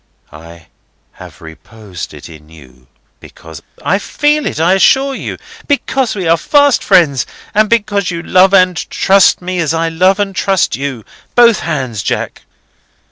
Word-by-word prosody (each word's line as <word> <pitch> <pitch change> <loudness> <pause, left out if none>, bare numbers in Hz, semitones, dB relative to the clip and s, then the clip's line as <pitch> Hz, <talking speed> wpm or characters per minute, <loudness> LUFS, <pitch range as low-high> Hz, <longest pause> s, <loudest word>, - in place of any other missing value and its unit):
"I 85 +1 -14 0.5
have - - -14
reposed 90 +3 -10
it - - -12
in 80 -2 -15
you, 65 -6 -18 0.3
because—" 80 -2 -13 0.2
"I 195 - +1
feel 295 +7 -1
it, - - -4
I 170 +3 +2
assure 270 +8 +2
you. - - -6 0.3
Because 270 -4 -1
we 185 -4 -3
are 165 +1 +3
fast 285 - +2
friends, 155 -9 +2 0.3
and 215 0 +2
because 205 -4 0
you 170 -1 -5
love 185 +2 +3
and 185 -2 +3
trust 195 -2 +2
me, 185 0 -3
as 165 -1 -1
I 165 0 -1
love 185 +4 +1
and 195 -1 -2
trust 195 -2 0
you. 135 -5 -6 0.3
Both 235 -4 +5
hands, 130 -9 -4
Jack." - - -4
180 Hz, 155 wpm, -13 LUFS, -, 0.5 s, Both